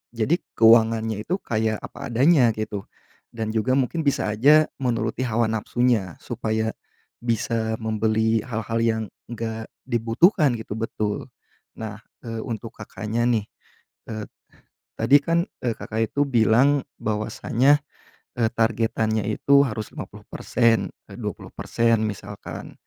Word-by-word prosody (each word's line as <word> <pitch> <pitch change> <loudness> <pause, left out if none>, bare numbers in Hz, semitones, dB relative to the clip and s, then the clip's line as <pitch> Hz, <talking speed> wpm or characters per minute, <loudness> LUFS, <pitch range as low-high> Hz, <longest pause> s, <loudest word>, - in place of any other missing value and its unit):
jadi 130 +10 +1 0.2
keuangannya 110 -1 +4
itu 180 - +1
kayak 110 -1 0
apa - - -7
adanya 125 -1 +4
gitu, 105 -2 -4 0.5
dan 110 -1 -2
juga 115 +4 +1
mungkin 135 +5 0
bisa 120 -6 +1
aja 145 +8 +6 0.2
menuruti 120 0 -1
hawa 115 -1 +1
nafsunya 110 -4 0
supaya 110 -1 -1 0.5
bisa 115 -1 -1
membeli 110 +1 +1
hal-hal 115 -1 -2
yang 115 -1 +1 0.2
nggak 110 -1 -5 0.2
dibutuhkan 125 - +3
gitu. 110 -1 -6
Betul. 105 -2 -2 0.5
Nah, 110 -1 -6 0.2
eee, 115 -1 -5
untuk 115 -1 -5
Kakaknya 110 +2 -2
nih, 115 -4 +2 0.7
eee, 110 -1 -4 0.8
tadi 120 +6 +6
kan, 170 +2 +1 0.2
eee, 120 - +1
Kakak 110 0 -2
itu 140 - +1
bilang 125 +4 +4 0.2
bahwasanya, 120 +6 +2 0.6
eee, 115 -2 +3
targetannya 110 -1 +1
itu 140 +6 +4
harus 110 -3 -5
50%, 115 -2 0 0.2
e - - -9
20%, 115 -1 -1
misalkan. 100 0 -8
115 Hz, 120 wpm, -24 LUFS, 110-120 Hz, 0.8 s, aja